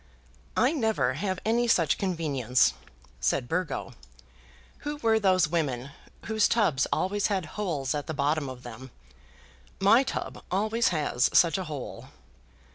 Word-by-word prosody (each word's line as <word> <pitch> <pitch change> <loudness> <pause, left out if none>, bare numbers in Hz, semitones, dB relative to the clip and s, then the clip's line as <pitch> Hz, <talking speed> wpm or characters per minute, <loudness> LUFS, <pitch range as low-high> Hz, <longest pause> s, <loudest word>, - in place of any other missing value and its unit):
"I - - +4
never 220 - +1
have 185 +5 -2
any 235 +2 +2
such 170 -10 +2
convenience," 145 - +1 0.5
said - - 0
Burgo. 175 +3 -3 0.9
"Who 295 0 -4
were 225 -5 +2
those 185 -4 +3
women 140 -6 -2 0.3
whose 220 -1 +2
tubs 180 - +2
always 200 +2 0
had 195 -5 -1
holes 160 -11 -2
at 145 -1 -4
the 160 - -3
bottom 145 0 0
of 130 -1 -9
them? 125 +2 -9 0.9
My 205 +6 +6
tub 270 - -5
always 215 +5 +1
has 150 -7 +1
such 170 +2 +4
a 185 - -4
hole." 150 -5 -7
170 Hz, 135 wpm, -27 LUFS, 140-210 Hz, 0.9 s, My